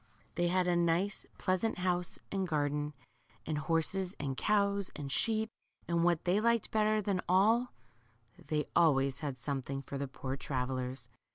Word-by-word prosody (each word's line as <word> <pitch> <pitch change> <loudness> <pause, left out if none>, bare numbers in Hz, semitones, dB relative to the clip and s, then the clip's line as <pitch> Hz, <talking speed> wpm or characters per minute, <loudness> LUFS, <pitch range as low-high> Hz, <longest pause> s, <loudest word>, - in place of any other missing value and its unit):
They 175 0 +1
had 180 +1 +2
a 175 - +3
nice, 175 +4 +1
pleasant 185 +4 0
house 180 -1 0
and 195 -1 0
garden, 150 -2 -1 0.5
and 155 -1 -1
horses, 175 +5 0
and 140 -2 -2
cows, 200 +2 +2
and 140 -2 -5
sheep, 220 +7 +1 0.4
and 170 -1 +2
what 170 -2 +2
they 185 +3 +3
liked 235 -1 +2
better 215 0 +2
than 190 -2 0
all, 220 +7 +4 0.8
they 150 -1 0
always 140 -5 +4
had 140 -3 -3
something 135 +1 -3
for 140 +1 -5
the 140 - -2
poor 130 0 -4
travellers. 130 -2 -3
170 Hz, 155 wpm, -33 LUFS, 140-195 Hz, 0.8 s, all